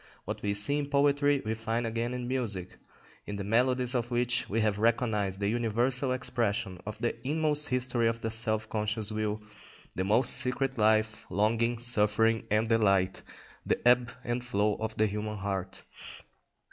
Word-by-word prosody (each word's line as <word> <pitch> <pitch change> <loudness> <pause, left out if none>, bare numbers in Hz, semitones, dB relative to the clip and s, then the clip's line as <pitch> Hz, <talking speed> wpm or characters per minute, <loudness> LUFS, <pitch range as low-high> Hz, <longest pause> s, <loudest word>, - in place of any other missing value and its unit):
What - - -5
we 100 0 -1
see 140 +9 +3
in 145 -1 -4
poetry 145 0 +2
we 110 - -1
find 115 +1 -2
again 115 +2 -2
in 125 -1 -4
music; 110 -8 -3 0.5
in 105 - -4
the 100 - -4
melodies 125 +4 +2
of 120 -2 -1
which 120 0 0
we 110 - 0
have 105 -1 0
recognised 105 -4 0
the 100 - -1
universal 120 +4 0
expression 115 -6 -1
of 105 - -5
the 120 +2 -2
inmost 150 +1 0
history 125 -2 +1
of 115 0 -1
the 115 - -3
self 110 -1 +1
conscious 105 0 -1
will, 110 0 -2 0.5
the 95 - -1
most 110 +6 +3
secret 130 0 +1
life, 110 +1 +1
longing, 115 +4 +1
suffering, 110 -1 +2
and 110 +2 +1
delight; 100 -5 +2 0.4
the - - 0
ebb 125 0 +4
and 120 +1 -2
flow 105 -3 0
of 110 0 -5
the 110 - +3
human 105 +1 -3
heart. 95 -1 -4
115 Hz, 165 wpm, -29 LUFS, 105-125 Hz, 0.5 s, ebb